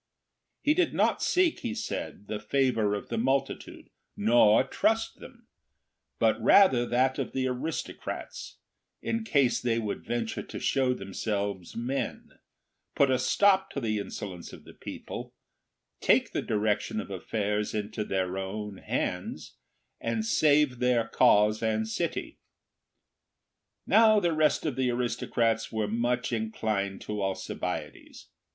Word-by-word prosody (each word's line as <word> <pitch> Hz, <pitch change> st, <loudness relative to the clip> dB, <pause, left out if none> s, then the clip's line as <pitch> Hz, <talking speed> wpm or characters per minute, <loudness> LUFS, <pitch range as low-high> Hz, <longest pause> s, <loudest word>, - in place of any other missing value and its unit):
He 295 Hz, -, +4 dB
did 360 Hz, +3 st, +1 dB
not -, -, +2 dB
seek, 360 Hz, -3 st, +2 dB
he 235 Hz, -2 st, -4 dB
said, 215 Hz, -, -5 dB
the 105 Hz, -, -3 dB
favour 110 Hz, -2 st, +1 dB
of 100 Hz, -, -7 dB
the 115 Hz, -, -1 dB
multitude, 135 Hz, +3 st, -2 dB, 0.3 s
nor 110 Hz, +1 st, +5 dB
trust 220 Hz, +11 st, 0 dB
them, -, -, -13 dB, 0.7 s
but -, -, +2 dB
rather 130 Hz, -12 st, +5 dB
that 130 Hz, +2 st, +1 dB
of -, -, -3 dB
the 130 Hz, -1 st, 0 dB
aristocrats, 130 Hz, +5 st, -5 dB, 0.5 s
in 230 Hz, 0 st, -1 dB
case 140 Hz, -, +2 dB
they 115 Hz, -2 st, +1 dB
would 110 Hz, -3 st, -3 dB
venture 115 Hz, -2 st, -2 dB
to -, -, -8 dB
show 130 Hz, -2 st, +1 dB
themselves 100 Hz, -2 st, -3 dB
men, 125 Hz, +4 st, -3 dB, 0.6 s
put 140 Hz, -2 st, +4 dB
a 130 Hz, -, +2 dB
stop 195 Hz, +8 st, +3 dB
to -, -, -2 dB
the 110 Hz, -4 st, -1 dB
insolence 95 Hz, -3 st, -7 dB
of -, -, -12 dB
the -, -, -14 dB
people, -, -, -8 dB, 0.6 s
take -, -, +3 dB
the -, -, -1 dB
direction 105 Hz, -, 0 dB
of -, -, -6 dB
affairs 105 Hz, 0 st, -2 dB
into 105 Hz, +1 st, -3 dB
their 95 Hz, -2 st, -2 dB
own 100 Hz, +1 st, -5 dB
hands, -, -, -3 dB, 0.4 s
and 115 Hz, -1 st, -2 dB
save 145 Hz, +2 st, +3 dB
their 125 Hz, -2 st, +2 dB
cause 105 Hz, -2 st, +4 dB
and 110 Hz, -1 st, 0 dB
city. 110 Hz, -, -3 dB, 1.5 s
Now 215 Hz, +1 st, +6 dB
the 175 Hz, -4 st, +1 dB
rest 155 Hz, 0 st, +2 dB
of 145 Hz, -5 st, -1 dB
the 130 Hz, -1 st, +1 dB
aristocrats 115 Hz, -2 st, 0 dB
were 110 Hz, -2 st, -1 dB
much 120 Hz, +3 st, -1 dB
inclined 110 Hz, -3 st, -2 dB
to 105 Hz, -1 st, -4 dB
Alcibiades. 95 Hz, -1 st, -5 dB
115 Hz, 135 wpm, -28 LUFS, 105-135 Hz, 1.5 s, Now